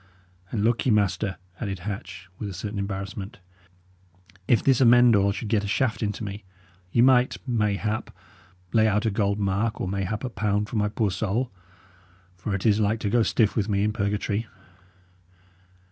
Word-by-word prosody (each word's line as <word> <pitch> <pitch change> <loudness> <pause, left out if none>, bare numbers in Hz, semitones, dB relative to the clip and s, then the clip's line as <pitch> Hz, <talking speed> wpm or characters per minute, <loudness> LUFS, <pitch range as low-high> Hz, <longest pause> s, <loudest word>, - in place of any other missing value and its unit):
"And, 105 -1 -2
look 120 +3 +1
ye, - - +4
master," 105 -1 +1 0.2
added 100 -3 -3
Hatch, 95 -1 -6
with 105 - -4
a 95 - -7
certain 105 +3 -4
embarrassment, 100 +2 -5 1.1
"if 120 - +3
this 135 -2 +3
Amend 120 -1 +6
All 100 0 +3
should 110 +3 -5
get 105 -1 +1
a - - -3
shaft 115 +3 0
into 105 0 -2
me, 100 0 -6 0.5
ye 115 - +4
might, 130 -1 +4
mayhap, 105 -2 -1 0.6
lay 110 -1 +4
out 105 0 +1
a 110 - +2
gold 100 0 0
mark 105 +3 0
or - - -2
mayhap 100 +3 -2
a 130 - -2
pound 105 -1 -1
for - - -6
my 105 0 +1
poor 105 -1 0
soul; 110 +6 -1 0.8
for 95 +2 -3
it 95 - -4
is 105 -1 +4
like 110 +1 +1
to 100 - -1
go 120 - +4
stiff 110 -1 +2
with 110 -1 0
me 100 -1 +1
in 105 0 +1
purgatory." 105 +1 -1
105 Hz, 175 wpm, -25 LUFS, 100-115 Hz, 1.1 s, Amend